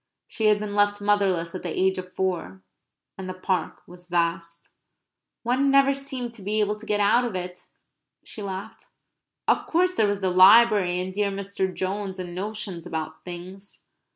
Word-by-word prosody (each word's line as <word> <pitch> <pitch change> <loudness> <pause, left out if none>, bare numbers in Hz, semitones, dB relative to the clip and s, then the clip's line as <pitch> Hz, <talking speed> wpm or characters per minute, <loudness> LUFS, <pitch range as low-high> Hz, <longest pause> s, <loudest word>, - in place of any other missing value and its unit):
She 220 - -3
had 210 -1 +5
been 210 0 -5
left 205 0 +2
motherless 195 -5 +1
at 185 - -5
the 175 - -4
age 190 0 +2
of 185 0 -8
four; 170 - -3 0.6
and 185 -1 -5
the 185 - -5
Park 185 0 -2
was 180 0 -12
vast. 170 -1 -2 0.7
"One 255 +4 +2
never 275 0 +5
seemed 255 -4 -5
able 210 +1 0
to 220 +1 -12
get 210 -1 +1
out 210 +5 +4
of 235 -5 -3
it," 180 0 -6 0.6
she 215 - -10
laughed. 200 +3 -7 0.6
Of - - +2
course 360 +2 +2
there 220 - +2
was 205 0 -1
the 190 -1 +1
library, 190 -1 +6
and 185 +1 -4
dear 205 +1 0
Mr. 195 -1 -3
Jones, 190 +1 -3
and 180 -2 -6
notions 195 -2 -5
about 160 -2 -5
things. 185 +3 -9
195 Hz, 170 wpm, -25 LUFS, 180-210 Hz, 0.7 s, library